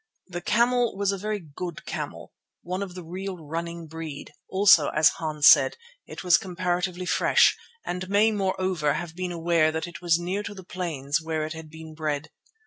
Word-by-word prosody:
The 175 -2 -6
camel 240 0 +2
was 200 0 +1
a 200 - -3
very 210 +1 -2
good 170 +1 -7
camel, - - -6 0.3
one 185 +2 -3
of 190 -3 -5
the 180 - -7
real 185 +3 -5
running 165 +2 -5
breed; 160 -2 -8 0.2
also, 190 -6 +6
as 155 0 +5
Hans 155 -3 -1
said, - - +7 0.3
it - - -8
was 180 -2 +5
comparatively 180 0 -2
fresh, - - +4 0.3
and 180 +1 -4
may, 210 +3 +4
moreover, 185 -6 0
have 165 +1 -5
been 180 0 -3
aware 165 -2 +2
that 160 0 -3
it 175 0 -10
was 170 -2 +3
near 180 +4 -2
to 205 0 -7
the 190 - -10
plains 165 -5 -2
where 160 -1 -2
it 155 - -5
had 160 -1 -9
been 160 0 -10
bred. 155 -1 -3
175 Hz, 185 wpm, -26 LUFS, 160-190 Hz, 0.3 s, said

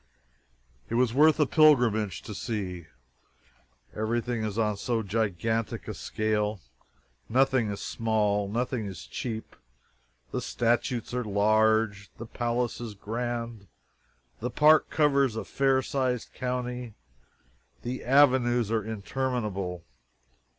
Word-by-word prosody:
It 115 - -2
was 120 -1 +2
worth 155 +4 +5
a 150 - +5
pilgrimage 120 - +3
to 105 - -7
see. 95 -7 -4 1.1
Everything 115 +1 -1
is 105 -1 -3
on 105 -2 +1
so 115 +1 -1
gigantic 110 +1 -1
a - - -3
scale. 105 -1 -1 0.7
Nothing 130 -2 +3
is 100 - -5
small 105 -3 0
nothing 120 0 -2
is 95 -3 -8
cheap. 110 -3 -5 0.8
The - - -2
statues 120 0 -1
are 125 0 -1
all 105 - -7
large; 110 -1 +2
the 115 - -7
palace 120 +1 -2
is 115 -3 -6
grand; 115 0 -4 0.7
the 125 - -2
park 150 +4 +5
covers 140 -5 +2
a 110 - -4
fair 135 -1 +2
sized 130 -3 -2
county; 125 -2 -4 0.9
the 125 +2 -4
avenues 125 -4 +4
are 110 -2 +1
interminable. 105 -5 -3
115 Hz, 115 wpm, -28 LUFS, 105-125 Hz, 1.1 s, worth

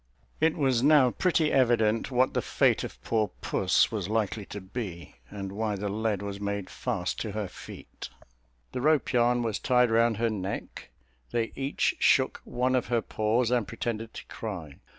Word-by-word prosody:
It 160 +1 +2
was 130 -5 +2
now 140 -3 +5
pretty 165 -2 +1
evident 115 -4 +2
what 130 0 +2
the - - +1
fate - - +2
of - - -7
poor 110 -2 +1
puss - - +2
was 105 -4 -3
likely 110 -2 -1
to 100 - -6
be, 95 - -7
and 100 -2 -6
why 105 +1 -2
the 100 +1 -3
lead 105 -1 -1
was 100 0 -5
made 100 -2 -3
fast 105 -8 -3
to 110 -3 -4
her 105 -2 -2
feet. - - -10 0.6
The 125 - -4
rope 155 0 +2
yarn 120 0 +3
was 110 -3 -1
tied 125 -3 +3
round 115 -1 +3
her 115 0 +1
neck; 95 -10 -5 0.4
they 115 -1 -1
each 135 +1 0
shook - - +3
one 125 +1 0
of 125 -5 +1
her 115 0 +1
paws, 115 +3 0
and 120 -4 +1
pretended 115 -1 -4
to - - -8
cry. 90 -10 -7
115 Hz, 175 wpm, -28 LUFS, 100-125 Hz, 0.6 s, now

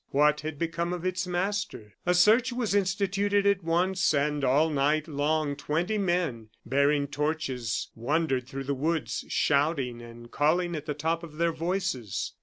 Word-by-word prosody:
What 150 +2 +3
had 155 -1 -5
become 170 +2 -2
of 180 0 -5
its 185 0 -1
master? 180 - -2
A 180 - +4
search 220 +8 +5
was 240 -4 -1
instituted 200 +1 +1
at 200 -2 +2
once, 175 +1 +1
and 145 0 0
all 145 +5 +3
night 150 +2 +1
long 150 0 0
twenty 175 +9 -1
men, 175 - -1 0.2
bearing 140 +3 +2
torches, 140 -5 -2
wandered 135 +1 0
through 135 +1 -5
the 140 +1 -1
woods, 155 +4 -2
shouting 140 -5 +1
and 120 0 -12
calling 170 +4 +1
at 150 0 -6
the 150 - -2
top 165 +3 -1
of 160 -3 -11
their 170 0 +2
voices. 165 - -2
155 Hz, 160 wpm, -28 LUFS, 140-180 Hz, 0.2 s, search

